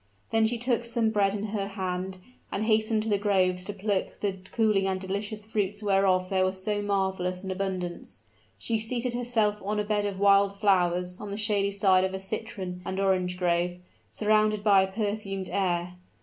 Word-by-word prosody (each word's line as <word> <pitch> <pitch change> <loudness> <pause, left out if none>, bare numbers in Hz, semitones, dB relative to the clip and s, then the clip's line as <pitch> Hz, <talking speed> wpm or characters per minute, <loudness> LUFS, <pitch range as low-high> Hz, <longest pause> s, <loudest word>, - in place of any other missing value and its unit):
Then 225 -1 +3
she 240 +1 -1
took 240 0 0
some 230 -1 +1
bread 200 -2 +2
in 205 - -4
her 200 -2 -1
hand, 185 -1 -4 0.3
and 205 - -1
hastened 220 0 +2
to - - -5
the 205 -1 +2
groves 185 -3 +1
to 205 - -3
pluck 200 -1 -2
the 195 -2 -2
cooling 215 -4 +2
and 190 -1 -1
delicious 205 +3 -4
fruits 205 -1 -2
whereof 195 -2 +3
there 190 -1 +3
was 185 0 -1
so 205 0 0
marvelous 190 -2 -1
an 190 - -4
abundance. 185 -2 -4 0.3
She 225 -1 -1
seated 240 +2 -1
herself 230 -4 0
on 210 +2 -1
a - - +1
bed 205 0 0
of 200 -2 -3
wild 200 0 +4
flowers 180 -2 +1
on 210 - -6
the 200 - -4
shady 210 -2 +1
side 195 -2 +4
of 190 0 -1
a - - -4
citron 190 -3 -4
and 190 +2 -4
orange 185 -2 +1
grove, 175 0 0 0.3
surrounded 215 -1 +2
by 200 -2 +6
a 190 0 -1
perfumed 200 -2 -3
air. 180 -2 -1
200 Hz, 190 wpm, -27 LUFS, 185-215 Hz, 0.3 s, by